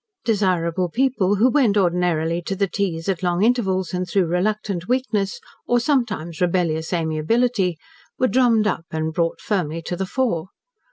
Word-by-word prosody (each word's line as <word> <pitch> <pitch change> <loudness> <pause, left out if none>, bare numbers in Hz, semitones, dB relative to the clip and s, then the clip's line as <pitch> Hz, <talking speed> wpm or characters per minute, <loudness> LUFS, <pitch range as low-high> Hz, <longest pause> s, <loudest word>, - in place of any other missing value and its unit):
Desirable 185 -5 +1
people, 230 -3 +1
who 220 +5 +4
went 250 -6 +3
ordinarily 175 -3 +1
to 195 +3 -3
the 200 +1 +1
teas 180 -4 -3
at 190 -4 -1
long 175 +1 +1
intervals 195 -6 +1
and 180 0 -2
through 190 0 +2
reluctant 185 +1 -1
weakness, 235 -6 -1 0.3
or 245 - +3
sometimes 220 - -1
rebellious 170 -3 0
amiability, 180 +4 +1 0.4
were 255 - +2
drummed 240 -4 +3
up 170 -5 -1
and 160 0 -2
brought 165 0 -1
firmly 170 -6 -2
to 170 +2 -4
the 190 +2 -3
fore. 190 -9 -1
185 Hz, 155 wpm, -22 LUFS, 170-220 Hz, 0.4 s, who